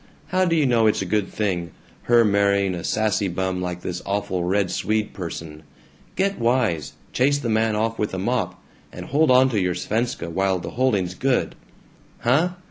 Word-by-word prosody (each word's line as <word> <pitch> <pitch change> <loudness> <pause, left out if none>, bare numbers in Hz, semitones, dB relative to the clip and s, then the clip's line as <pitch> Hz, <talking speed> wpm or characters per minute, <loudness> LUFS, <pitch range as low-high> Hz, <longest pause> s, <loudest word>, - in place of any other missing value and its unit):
How 185 +1 +2
do 170 -2 +1
you 155 -3 +3
know 115 -3 +3
it's 105 - +1
a - - -5
good 100 +1 0
thing, 90 -5 -2 0.4
her 120 -1 +6
marrying 100 -2 +2
a 85 -2 -5
sassy 105 -2 0
bum 95 0 -2
like 90 -1 -4
this 90 0 -4
awful 100 -3 -2
Red 95 +1 +1
Swede 110 0 -1
person? 80 -4 -7 0.5
Get 195 +2 0
wise! 115 - +1 0.2
Chase 140 +3 +3
the 130 -5 -3
man 110 0 +2
off 115 +1 -1
with 105 - -1
a - - -3
mop, 95 -3 -1 0.3
and - - -8
hold 155 +3 +2
onto 130 -2 +5
your 90 -3 +1
Svenska 110 +2 -2
while 95 +2 +1
the 85 - -6
holding's 105 -8 0
good. 130 +6 0 0.7
Huh? 155 +9 +2
105 Hz, 180 wpm, -23 LUFS, 90-120 Hz, 0.7 s, her